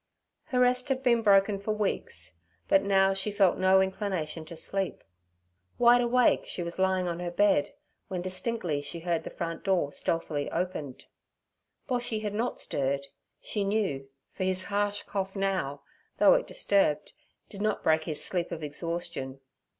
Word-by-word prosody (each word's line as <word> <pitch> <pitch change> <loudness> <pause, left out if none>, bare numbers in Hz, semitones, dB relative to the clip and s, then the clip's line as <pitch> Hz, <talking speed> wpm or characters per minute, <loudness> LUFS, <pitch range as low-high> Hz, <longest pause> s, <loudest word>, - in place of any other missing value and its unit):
Her 250 - -1
rest 250 +1 +2
had 265 0 0
been 235 -2 +4
broken 200 -1 +4
for 215 +2 -1
weeks, 205 - -2 0.3
but 195 - +5
now 195 -1 +3
she 195 +2 -1
felt 200 -3 +3
no 190 0 +5
inclination 190 -5 -2
to 170 - -9
sleep. 195 +3 -3 0.7
Wide 245 0 +6
awake, 245 +1 +3
she 175 - -3
was 170 +2 -6
lying 190 -1 +2
on 170 0 -3
her 175 0 -3
bed, 200 +2 +3 0.4
when 185 -3 -4
distinctly 185 -4 -2
she 165 +4 -6
heard 170 -1 -1
the - - -6
front 165 -2 -5
door 180 -7 +1
stealthily 155 -3 -1
opened. 155 -8 -3 0.8
Boshy 240 -3 -1
had 205 -1 -2
not 235 +4 -2
stirred, 140 0 -1 0.4
she 210 - -2
knew, 195 -10 -1 0.2
for - - -3
his 185 0 0
harsh 205 0 0
cough 195 -1 -3
now, 190 -8 -1 0.3
though - - +7
it - - +1
disturbed, 200 - +1 0.3
did 200 - -9
not 215 -1 0
break 160 0 +3
his 155 -2 0
sleep 175 -2 -1
of 160 -2 -5
exhaustion. 150 -3 -4
190 Hz, 160 wpm, -29 LUFS, 170-205 Hz, 0.8 s, though